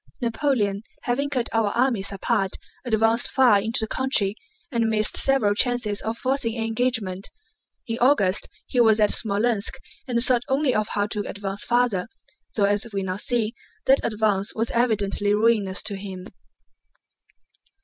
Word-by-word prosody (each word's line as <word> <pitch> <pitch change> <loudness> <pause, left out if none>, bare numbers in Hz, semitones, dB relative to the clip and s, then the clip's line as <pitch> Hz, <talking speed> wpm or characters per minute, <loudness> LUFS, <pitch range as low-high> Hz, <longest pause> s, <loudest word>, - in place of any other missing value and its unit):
Napoleon 230 -4 0 0.2
having 275 +3 -1
cut 255 -4 -1
our 225 -2 +2
armies 235 -6 +1
apart 195 0 -1 0.3
advanced 225 0 +2
far 245 -7 +4
into 225 +4 +1
the 220 - -1
country 215 -6 +1 0.4
and 230 -3 +1
missed 215 -1 +2
several 270 -7 +3
chances 235 -2 +1
of 225 +1 -3
forcing 255 -3 -1
an 225 - -1
engagement. 225 -5 -1 0.6
In 230 -2 -3
August 235 -8 +3 0.2
he 250 - -1
was 220 -2 +4
at 210 -1 +4
Smolénsk 215 0 0 0.3
and 240 -2 0
thought 250 -2 +4
only 270 -1 +1
of 215 0 0
how 205 -2 0
to 210 -1 -3
advance 200 0 -5
farther, 240 -6 +1 0.5
though 210 - +1
as 205 +3 0
we 195 -1 -2
now 185 0 -3
see 225 0 -1 0.3
that 270 +1 +5
advance 210 -2 0
was 225 +1 -1
evidently 205 -3 +1
ruinous 210 -3 +1
to 205 - -4
him. 190 -2 -7
220 Hz, 150 wpm, -24 LUFS, 205-245 Hz, 0.6 s, that